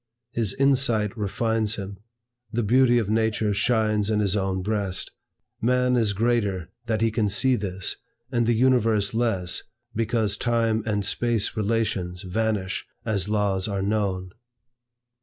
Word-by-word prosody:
His 110 Hz, -5 st, -1 dB
insight 130 Hz, -7 st, +2 dB
refines 110 Hz, 0 st, 0 dB
him. 100 Hz, -2 st, -7 dB, 0.5 s
The 120 Hz, 0 st, 0 dB
beauty 120 Hz, +3 st, +4 dB
of 115 Hz, -4 st, +1 dB
nature 110 Hz, -1 st, +1 dB
shines 110 Hz, -1 st, +1 dB
in 105 Hz, -1 st, +1 dB
his 100 Hz, -1 st, +1 dB
own 95 Hz, -2 st, -1 dB
breast. 100 Hz, -3 st, -1 dB, 0.5 s
Man 125 Hz, +2 st, +2 dB
is 110 Hz, -4 st, +2 dB
greater 100 Hz, -5 st, 0 dB, 0.2 s
that 110 Hz, -1 st, 0 dB
he 115 Hz, 0 st, +2 dB
can 105 Hz, -1 st, +1 dB
see 130 Hz, +6 st, +3 dB
this, 100 Hz, -3 st, -3 dB, 0.3 s
and 120 Hz, -3 st, +1 dB
the 120 Hz, -, +3 dB
universe 115 Hz, -4 st, +2 dB
less, 110 Hz, -6 st, 0 dB, 0.3 s
because 110 Hz, -2 st, 0 dB
Time 115 Hz, -2 st, +1 dB
and 105 Hz, -2 st, 0 dB
Space 115 Hz, -1 st, 0 dB
relations 100 Hz, -5 st, -1 dB
vanish 100 Hz, 0 st, -2 dB, 0.2 s
as 105 Hz, -3 st, 0 dB
laws 100 Hz, -2 st, 0 dB
are 100 Hz, -2 st, -2 dB
known. 100 Hz, -3 st, -1 dB
110 Hz, 140 wpm, -25 LUFS, 100-115 Hz, 0.5 s, beauty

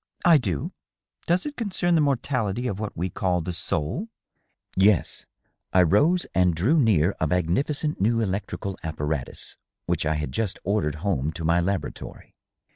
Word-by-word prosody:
" -, -, -12 dB
I 170 Hz, -4 st, +7 dB
do. 90 Hz, -, -2 dB, 0.6 s
Does 175 Hz, +2 st, +2 dB
it 295 Hz, -1 st, -4 dB
concern 190 Hz, -6 st, 0 dB
the 165 Hz, -, +4 dB
mortality 125 Hz, -5 st, 0 dB
of 100 Hz, -5 st, -2 dB
what 105 Hz, -1 st, -5 dB
we 90 Hz, +2 st, -2 dB
call 90 Hz, -1 st, 0 dB
the 90 Hz, +2 st, -3 dB
soul 85 Hz, -, -1 dB, 0.2 s
?" -, -, -48 dB
" -, -, -62 dB
Yes." 95 Hz, -2 st, +2 dB, 0.5 s
I 90 Hz, -, +6 dB
rose 150 Hz, -, +3 dB
and 90 Hz, -2 st, +3 dB
drew 125 Hz, -, +3 dB
near 100 Hz, -, +3 dB
a 80 Hz, -, +1 dB
magnificent 95 Hz, -, 0 dB
new 115 Hz, +3 st, +3 dB
electrical 100 Hz, -1 st, -3 dB
appa 80 Hz, -3 st, -5 dB
ratus 75 Hz, -4 st, -4 dB, 0.3 s
which -, -, 0 dB
I 80 Hz, -, +1 dB
had 75 Hz, -3 st, -3 dB
just 105 Hz, -, -2 dB
ordered 90 Hz, -7 st, 0 dB
home 80 Hz, -7 st, 0 dB
to 80 Hz, +1 st, -5 dB
my 85 Hz, +2 st, +3 dB
laboratory. 90 Hz, -4 st, -4 dB
95 Hz, 175 wpm, -25 LUFS, 85-130 Hz, 0.6 s, I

